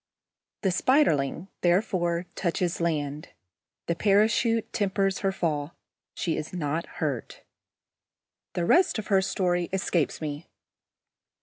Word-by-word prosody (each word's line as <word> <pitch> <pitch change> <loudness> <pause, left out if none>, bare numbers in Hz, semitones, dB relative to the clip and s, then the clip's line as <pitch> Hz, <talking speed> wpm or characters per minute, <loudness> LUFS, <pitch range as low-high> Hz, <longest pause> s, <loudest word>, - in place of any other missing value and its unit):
The 190 - +3
Spiderling, 180 - +2
therefore, 175 -1 +1
touches 175 -1 -1
land. 150 -3 -2 0.6
The 170 - 0
parachute 220 +4 +2
tempers 195 -1 0
her 195 - +1
fall. 155 -4 -2 0.4
She 165 -4 -1
is 155 - -5
not 160 -1 -2
hurt. 140 -7 -3 1.1
The 175 - -1
rest 355 - +4
of 215 - -5
her 195 -2 +4
story 175 -2 0
escapes 185 -4 0
me. 150 0 -5
175 Hz, 110 wpm, -27 LUFS, 155-195 Hz, 1.1 s, rest